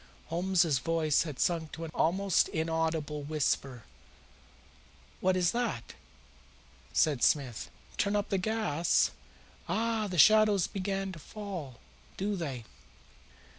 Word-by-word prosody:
Holmes's 170 -4 +2
voice 160 -1 +1
had 140 - -8
sunk 165 -3 0
to 165 - -5
an 160 - -8
almost 190 +3 +2
inaudible 160 -2 -1
whisper. 140 -4 -1 1.4
"What 185 0 +2
is 180 -1 +2
that?" 235 - -3 1.0
said 145 -6 +2
Smith. 130 -7 +1 0.3
"Turn 200 0 +1
up 205 -1 0
the 195 - +1
gas? 185 -6 +1 0.6
Ah, 225 -1 0
the 180 -2 -4
shadows 215 0 +6
begin 195 0 -3
to 170 - -9
fall, 180 - -7 0.4
do 200 +2 -1
they? 140 -9 -4
170 Hz, 115 wpm, -30 LUFS, 150-200 Hz, 1.4 s, shadows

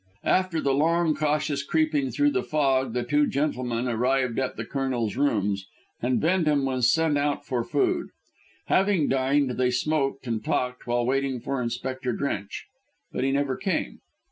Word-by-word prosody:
After 185 -3 +2
the 140 -3 +1
long, 165 +3 +2
cautious 150 -1 0
creeping 155 -2 +1
through 145 +5 +2
the 125 - 0
fog 135 -5 +1
the 125 0 -1
two 145 +4 +2
gentlemen 130 -4 -1
arrived 125 +1 +1
at 130 -1 -2
the 115 - -4
Colonel's 125 -5 -2
rooms, 105 -8 0 0.3
and 125 +1 +1
Bendham 155 -5 +2
was 130 -2 +2
sent 160 -3 +2
out 145 0 -1
for 125 -3 -1
food. 360 - 0 0.6
Having 190 -5 +2
dined, 135 +1 +2
they 125 -1 +3
smoked 135 +1 -1
and 115 -3 -2
talked 125 +2 -2
while 120 0 +1
waiting 135 0 0
for 135 +2 -3
Inspector 130 +2 -3
Drench. 110 -6 -3 0.5
But - - -2
he 135 - +1
never 140 -1 0
came. 185 - -2
135 Hz, 160 wpm, -26 LUFS, 125-150 Hz, 0.6 s, they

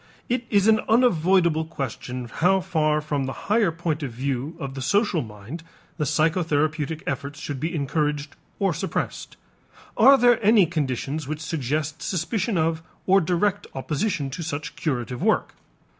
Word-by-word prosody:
It 240 -1 -1
is 205 -1 +3
an 220 -1 +5
unavoidable 180 -8 +3
question 130 -5 -5
how 180 +10 +2
far 155 -4 +1
from 145 -3 -2
the 135 - -3
higher 210 -4 +3
point 165 -2 -2
of 135 -4 -3
view 135 +5 -3
of 135 -1 -5
the 135 - -6
social 200 - +2
mind 110 +7 -8 0.4
the 150 - 0
psychotherapeutic 155 0 0
efforts 140 +1 -4
should 145 -4 -5
be 160 +5 -2
encouraged 150 0 -1 0.2
or 195 -3 +1
suppressed. 180 +5 -4 0.6
Are 275 0 +7
there 245 -2 +4
any 210 -2 +6
conditions 145 -2 -2
which 155 +1 -3
suggest 155 0 -2
suspicion 185 +4 -1
of 160 0 +1 0.2
or 195 +1 +5
direct 185 +4 0
opposition 150 +2 -2
to 155 - -5
such 150 -2 -4
curative 125 -5 -3
work? - - +1
155 Hz, 150 wpm, -24 LUFS, 140-185 Hz, 0.6 s, Are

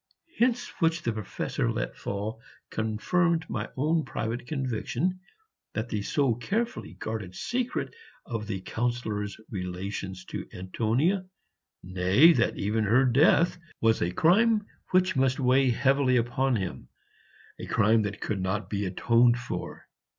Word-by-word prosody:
Hints 245 -2 +2
which 165 -1 +1
the 115 - 0
Professor 110 -3 -2
let - - -3
fall 105 +3 -4 0.3
confirmed 160 +10 0
my 110 -1 -3
own 155 +4 +2
private 120 0 -4
conviction 135 +5 -2 0.6
that 110 +2 -2
the 105 - -2
so 135 +4 +1
carefully 210 - -3
guarded 105 -5 -5
secret 250 - -2 0.3
of 115 -3 -4
the 95 -3 -3
Councillor's 110 -2 -2
relations 95 0 -5
to - - -6
Antonia, 120 - 0 0.6
nay, 95 - +5
that - - +1
even 110 +2 0
her 120 +6 +4
death, 155 +7 +4 0.2
was 115 0 +2
a 85 - +1
crime 210 - +3 0.2
which 185 0 +3
must 130 0 +2
weigh 130 0 +4
heavily 130 +1 +3
upon 125 +2 +1
him, 95 - -4 0.7
a - - -6
crime 110 0 +3
that 105 0 -4
could 100 -4 -2
not 95 +1 -2
be 100 -1 -1
atoned 120 +5 +3
for. 120 0 -6
120 Hz, 135 wpm, -28 LUFS, 105-150 Hz, 0.7 s, nay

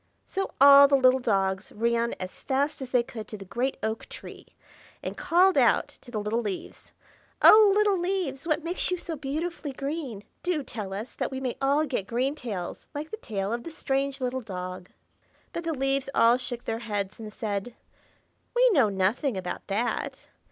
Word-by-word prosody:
So 390 0 -3
all 280 +1 +9
the 280 0 +4
little 260 0 +5
dogs 195 -4 0
ran 235 +1 0
as 185 0 -7
fast 275 +2 -1
as 260 - -5
they 250 -2 +3
could 220 -3 -8
to 215 - -7
the 195 - -10
great 245 +7 -2
oak 220 +1 -3
tree, - - -10 0.6
and - - -4
called 370 +1 +4
out - - +3
to - - -17
the 235 - -4
little 210 +3 -1
leaves, 205 -4 -6 0.5
"Oh, 425 -2 +9
little 410 -3 +3
leaves! 350 -6 -2
what 310 -1 +1
makes 345 +2 0
you 365 - 0
so 340 -1 -5
beautifully 305 +1 -4
green? 275 -6 -4 0.2
Do 350 -5 -1
tell 210 -6 -6
us, 210 +5 -5
that - - -2
we 265 - -5
may 255 -2 -3
all 285 +3 +3
get 245 -9 -3
green 255 +5 0
tails, 210 -12 -6
like 300 +2 -5
the 440 - -4
tail 205 - -3
of 240 - -2
the - - -6
strange 275 -3 -2
little 255 0 -2
dog." 180 -3 -6 0.6
But 340 - -4
the 330 - 0
leaves 270 0 0
all 235 +2 +5
shook 245 -1 -5
their 225 0 -3
heads, 205 -3 -4
and 215 -1 -7
said, 210 +2 -4 0.8
"We - - +6
know 270 - +4
nothing 200 +5 0
about 180 -1 -5
that. 215 +5 -2
255 Hz, 185 wpm, -27 LUFS, 215-295 Hz, 0.8 s, all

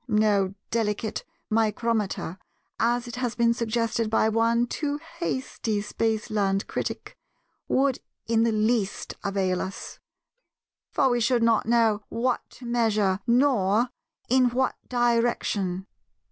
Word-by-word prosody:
No 210 -3 +2 0.2
'delicate 215 -1 -1 0.3
micrometer'—as 225 +1 -1
has 245 -2 -2
been 235 -1 +3
suggested 230 -1 -1
by 220 0 +3
one 230 +2 +2
too 290 +3 -3 0.2
hasty 255 -9 -2
Spaceland 210 -2 0
critic—would 270 -1 -3 0.3
in 225 0 +2
the 230 0 +3
least 215 -1 0
avail 190 -2 0
us; 190 - -6 0.9
for 275 - +2
we 245 - +2
should 235 0 +2
not 230 -2 +3
know 225 -3 +3
what 245 +2 0
to 250 - -13
measure, 215 -5 +1
nor 235 -3 +3 0.4
in 255 0 +4
what 255 +2 0
direction. 230 -6 +1
230 Hz, 105 wpm, -26 LUFS, 210-240 Hz, 0.9 s, in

